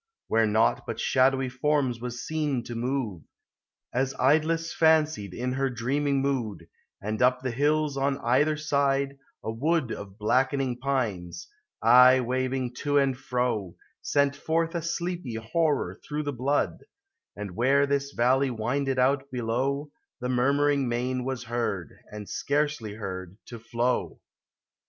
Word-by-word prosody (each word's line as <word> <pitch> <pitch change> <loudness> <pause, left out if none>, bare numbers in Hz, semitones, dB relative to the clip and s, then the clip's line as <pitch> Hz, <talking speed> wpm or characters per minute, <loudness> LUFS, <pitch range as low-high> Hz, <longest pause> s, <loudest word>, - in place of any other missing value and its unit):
Where 115 0 +3
naught 110 +2 +2
but - - -4
shadowy 130 0 +3
forms 130 -2 0
was 120 0 -5
seen 150 -6 -1
to 120 - -7
move, 120 - -2 0.7
As 130 +2 0
Idless 160 +4 +2
fancied 155 - +3
in 125 +6 -3
her 135 +1 0
dreaming 135 +3 0
mood: 115 -11 -2 0.3
And 110 +2 -3
up 125 +1 +3
the 130 - -1
hills, 145 +3 +1
on 135 0 +1
either 145 +6 +2
side, 140 -2 0 0.2
a 110 - -2
wood 140 +2 0
Of 100 -1 -7
blackening 130 +3 +1
pines, 95 -10 -2 0.4
aye 125 +1 +8
waving 130 0 -1
to 145 -1 +1
and 135 -2 +3
fro, 120 -8 -2 0.3
Sent 140 0 +1
forth 165 +3 -1
a 170 - -1
sleepy 170 -5 -3
horror 145 +8 0
through 150 0 -3
the 145 -1 -3
blood; 135 +4 0 0.5
And 105 -2 -6
where 135 +5 +3
this 140 0 0
valley 130 +3 +2
winded 130 +4 -1
out, 135 +2 +2
below, 130 +4 -1 0.3
The 125 - -3
murmuring 140 +1 +2
main 125 +1 -1
was 130 -2 -3
heard, 115 - -3 0.2
and 105 -1 -7
scarcely 145 -7 -1
heard, 95 -3 -6
to 120 - -9
flow. 120 +2 -1
130 Hz, 140 wpm, -27 LUFS, 120-140 Hz, 0.7 s, aye